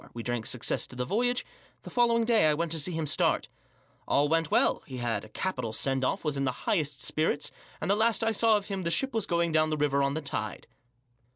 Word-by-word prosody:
We 115 - -5
drank 120 -1 -2
success 125 -2 -1
to - - -7
the 125 0 -2
voyage. 245 - 0 0.4
The - - -9
following 235 -1 +3
day 225 -8 +4
I 150 - +3
went 165 +1 -2
to 165 - 0
see 165 +5 -1
him 160 -2 -2
start. 145 - +1 0.6
All 145 +1 +3
went 165 0 +1
well; - - +3
he 130 - -7
had 115 -4 -1
a 110 - -12
capital 125 -4 -3
send 135 +3 0
off; 180 +7 -1
was 150 -2 0
in 135 - 0
the 130 -2 -3
highest 145 - 0
spirits; 155 -2 0 0.3
and - - -3
the - - +4
last 225 +1 +2
I 225 - +2
saw 220 0 +4
of 205 - -5
him 195 -2 -4
the 170 - -2
ship 265 - +1
was 225 -3 -1
going 170 -1 +1
down 155 0 +3
the 155 - -1
river 145 -1 +1
on 140 +1 0
the 160 - -2
tide. 140 - -4
155 Hz, 245 wpm, -28 LUFS, 135-200 Hz, 0.6 s, day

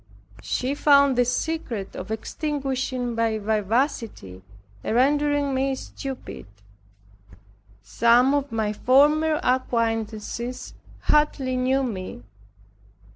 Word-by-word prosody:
She 255 +2 -2
found 280 -2 +4
the 245 0 +3
secret 250 - -3
of - - -7
extinguishing 260 0 -3
my 225 -1 0
vivacity, 215 - -2 0.4
and - - -1
rendering 290 +2 +2
me 265 +1 0
stupid. 265 - -8 1.4
Some 235 - +3
of 285 -1 -1
my 220 -2 -1
former 300 +6 +3
acquaintances 235 -1 -2 0.3
hardly 285 -4 +1
knew 260 +2 +1
me. 185 - -5
255 Hz, 90 wpm, -24 LUFS, 225-280 Hz, 1.4 s, found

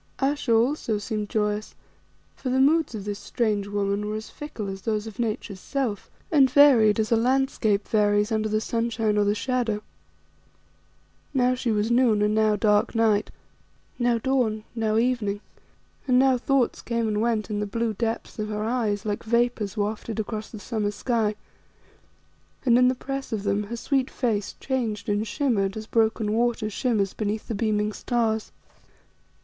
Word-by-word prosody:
Ayesha 275 -2 0
also 230 -1 +2
seemed 210 0 -3
joyous, 210 0 -1 0.6
for 260 - -4
the 260 +1 +1
moods 305 -1 +3
of 205 -2 -6
this 205 0 -4
strange 210 -1 -1
woman 205 0 -1
were 215 - -2
as 215 0 -6
fickle 235 -8 -6
as 195 0 -6
those 215 +1 -1
of 220 0 -9
Nature's 215 -4 -3
self, 245 -4 -3 0.2
and 275 -4 +5
varied 250 -6 +6
as 215 +1 0
a - - +6
landscape 230 -4 +1
varies 210 0 +2
under 215 0 0
the 215 0 +1
sunshine 225 -2 0
or 205 -1 +3
the 205 +1 +2
shadow. 230 -3 -1 1.5
Now 250 -1 +3
she 250 -1 -2
was 215 +2 0
noon 235 -4 +3
and 210 0 +2
now 215 -1 +3
dark 210 +2 +2
night; 220 -2 +2 0.7
now 240 -1 +2
dawn, 230 -3 0
now 220 -2 0
evening, 225 -4 0 0.7
and 250 -1 +4
now 265 0 +5
thoughts 255 0 +1
came 235 -1 -1
and 210 -1 0
went 225 -2 0
in 205 - -1
the 210 - -2
blue 230 +2 -1
depths 225 +1 -3
of 215 - -2
her 210 0 -2
eyes 220 -3 -1
like 205 -1 -2
vapours 235 -2 0
wafted 210 +1 -2
across 215 0 -4
the 220 - -9
summer 215 -1 -2
sky, 215 0 0 1.3
and 240 -2 +5
in 250 - +5
the 255 - +2
press 270 +1 -5
of 215 -3 -2
them 200 0 0
her 235 +3 -5
sweet 265 +1 0
face 220 -6 -2
changed 225 -7 -2
and 205 +2 0
shimmered 210 -6 0
as 220 - -6
broken 220 -1 +1
water 230 -1 0
shimmers 210 -4 0
beneath 215 0 -3
the - - -3
beaming 210 0 0
stars. 220 -1 -1
220 Hz, 170 wpm, -25 LUFS, 210-240 Hz, 1.5 s, varied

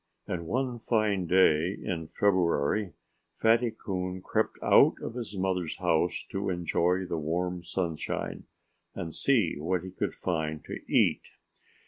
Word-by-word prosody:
And 85 -2 -4
one 125 +2 -1
fine 105 -6 +1
day 90 0 +4
in 80 -3 -4
February 95 0 +1 0.5
Fatty 115 +2 +4
Coon 95 -4 -4
crept - - 0
out - - +6
of - - -5
his 115 -5 -6
mother's 95 -3 -1
house 80 +2 +1
to 95 0 -2
enjoy 90 +1 +1
the 85 -2 -3
warm 90 +3 -2
sunshine 85 -3 -3 0.5
and 80 -2 -5
see 115 - +2
what 90 +3 -1
he 95 - -7
could - - -3
find 80 -3 -2
to - - -6
eat. - - +2
90 Hz, 135 wpm, -29 LUFS, 85-100 Hz, 0.5 s, out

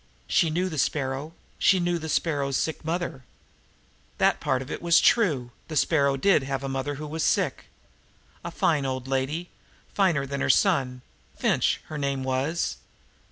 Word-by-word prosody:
She 165 - +2
knew 175 +4 0
the 155 -5 -4
Sparrow; 135 +3 -1 0.3
she 190 - +4
knew 175 -1 0
the 160 0 -6
Sparrow's 140 -5 0
sick 160 - -2
mother. 165 -5 -3 0.9
That - - +3
part 130 0 0
of 135 - -10
it - - -5
was 170 -1 +5
true. 145 - +2 0.2
The 155 - -6
Sparrow 140 -3 +2
did 195 +5 +4
have 135 0 -3
an 135 - -3
old - - -4
mother 135 +2 -2
who 150 +2 -6
was 155 +2 -3
sick. - - 0 0.8
A - - -4
fine 155 -4 +1
old 130 -1 -4
lady 135 +6 -2 0.4
finer 175 -9 +2
than 140 +1 -4
the - - 0
son 130 -8 +2 0.3
Finch, - - +1
her 155 -1 -6
name 140 -1 -1
was. 130 - -1
145 Hz, 170 wpm, -26 LUFS, 135-165 Hz, 0.9 s, was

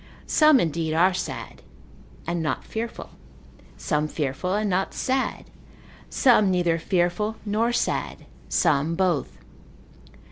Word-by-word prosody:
Some 305 -3 +5
indeed 160 -2 -1
are 180 +3 +4
sad, 185 - -5 0.6
and 170 0 -2
not 155 - -2
fearful; 225 +1 -6 0.7
some 150 -1 -1
fearful 150 +4 -3
and 210 0 0
not 190 0 -1
sad; 265 0 -1 0.6
some 235 -7 +4
neither 175 -2 +1
fearful 180 +5 0
nor 220 +3 +1
sad; 240 - -2 0.2
some 160 -1 +1
both. 165 - 0
180 Hz, 110 wpm, -24 LUFS, 160-215 Hz, 0.7 s, Some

